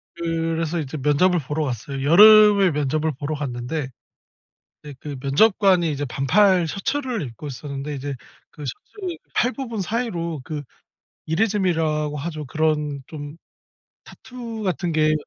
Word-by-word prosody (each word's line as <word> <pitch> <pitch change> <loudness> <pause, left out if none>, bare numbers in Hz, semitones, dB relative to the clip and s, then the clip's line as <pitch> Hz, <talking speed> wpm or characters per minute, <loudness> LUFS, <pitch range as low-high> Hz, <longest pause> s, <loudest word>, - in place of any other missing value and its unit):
그래서 165 0 -1
이제 150 0 -5
면접을 150 +6 +3
보러 150 +2 -3
갔어요. 135 +2 -4
여름에 205 +2 +8
면접을 150 +2 0
보러 150 +2 -3
갔는데 135 +1 -4 1.0
예 145 - -8
그 145 0 -6
면접관이 180 +3 +3
이제 145 0 -3
반팔 175 +7 +3
셔츠를 245 - -2
입고 130 +3 -8
있었는데 140 +1 -6
이제 140 0 -4 0.4
그 150 - -11
셔츠 350 - -6 0.2
팔 245 - +2
부분 235 -6 -5
사이로 175 - -3
그 150 -2 -4 0.7
이레즈미라고 160 -5 0
하죠? 155 +1 -5
그런 150 -1 -1
좀 145 0 -8 0.7
타투 235 -3 -8
같은 180 -2 -1
게 155 -1 +3
155 Hz, 280 characters per minute, -22 LUFS, 145-195 Hz, 1.0 s, 여름에